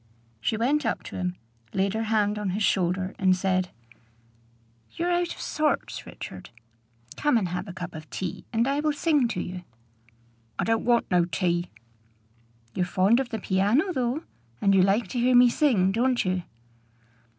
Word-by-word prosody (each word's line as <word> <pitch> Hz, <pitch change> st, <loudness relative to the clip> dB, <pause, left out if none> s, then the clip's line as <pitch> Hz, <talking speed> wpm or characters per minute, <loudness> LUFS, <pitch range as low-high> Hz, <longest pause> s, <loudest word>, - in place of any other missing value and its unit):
She 170 Hz, -, -1 dB
went 280 Hz, +7 st, +1 dB
up 230 Hz, -, -1 dB
to -, -, -9 dB
him, 180 Hz, -1 st, -2 dB, 0.4 s
laid 195 Hz, +1 st, +1 dB
her 220 Hz, -, -1 dB
hand 210 Hz, -1 st, +1 dB
on 205 Hz, -2 st, -2 dB
his 215 Hz, -, 0 dB
shoulder, 185 Hz, 0 st, +1 dB
and 185 Hz, -1 st, +4 dB
said, 185 Hz, -1 st, 0 dB, 1.2 s
"You're 350 Hz, +1 st, -1 dB
out 350 Hz, 0 st, 0 dB
of -, -, -15 dB
sorts, 305 Hz, -3 st, -1 dB
Richard. 95 Hz, -, -9 dB, 0.7 s
Come 295 Hz, -5 st, +3 dB
and 190 Hz, -5 st, 0 dB
have 180 Hz, +3 st, -4 dB
a -, -, -6 dB
cup 180 Hz, 0 st, -7 dB
of 155 Hz, -1 st, -9 dB
tea, 185 Hz, -3 st, -5 dB
and 230 Hz, +2 st, +1 dB
I 280 Hz, +1 st, +1 dB
will 305 Hz, 0 st, +1 dB
sing 290 Hz, -4 st, +2 dB
to 225 Hz, -, -3 dB
you." 180 Hz, 0 st, -5 dB, 0.9 s
"I -, -, 0 dB
don't 225 Hz, 0 st, 0 dB
want 240 Hz, -3 st, +2 dB
no 175 Hz, -1 st, +4 dB
tea." 175 Hz, 0 st, -1 dB, 1.0 s
"You're 185 Hz, -, 0 dB
fond 195 Hz, +6 st, +3 dB
of 265 Hz, -2 st, -2 dB
the 225 Hz, -, -3 dB
piano, 215 Hz, -, +1 dB
though. 255 Hz, +3 st, -1 dB, 0.4 s
And 195 Hz, -, +3 dB
you 190 Hz, -, +5 dB
like 195 Hz, +3 st, +2 dB
to 245 Hz, -, -2 dB
hear 250 Hz, +1 st, +3 dB
me 245 Hz, 0 st, +7 dB
sing, 225 Hz, -12 st, +3 dB
don't 245 Hz, +3 st, +1 dB
you?" 185 Hz, 0 st, 0 dB
210 Hz, 175 wpm, -26 LUFS, 185-250 Hz, 1.2 s, me